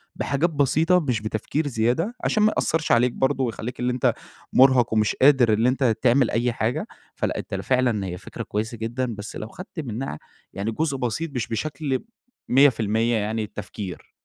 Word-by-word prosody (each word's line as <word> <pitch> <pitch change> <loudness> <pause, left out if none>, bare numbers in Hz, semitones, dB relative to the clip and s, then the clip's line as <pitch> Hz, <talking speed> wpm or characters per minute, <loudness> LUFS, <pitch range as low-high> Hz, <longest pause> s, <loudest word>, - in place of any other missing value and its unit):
بحاجات 140 +6 0
بسيطة 160 +4 +3
مش 125 -9 -1
بتفكير 110 +8 -2
زيادة، 125 - 0
عشان 215 - +2
ما 215 - +4
يأثرش 160 -1 0
عليك 120 +1 +4
برضه، 135 +2 0
ويخلّيك 120 0 -4
اللي 125 0 0
أنت 125 - +2 0.4
مُرهق، 130 -3 +5
ومش 110 -1 +2
قادر 130 -5 +6
اللي 115 +3 +3
أنت 130 -3 +1
تعمل 125 0 +4
أي 120 +2 +1
حاجة، 115 +2 -1 0.3
فلأ، - - -2
أنت - - -5
فعلًا 125 -6 +1
هي 90 -1 -4
فكرة - - -8
كويسة 110 +3 -3
جدًا، 120 +2 -3
بس 105 +1 -8
لو 110 - -5
خدت 180 - -9
منها 120 - -4 0.3
يعني 100 +3 -2
جزء 140 +3 -1
بسيط 130 +6 -2
مش 120 -3 -1
بشكل 135 +2 -2 0.5
100% 115 -4 +3
يعني 110 +1 -1
التفكير. 105 -2 -7
125 Hz, 170 wpm, -24 LUFS, 110-140 Hz, 0.5 s, قادر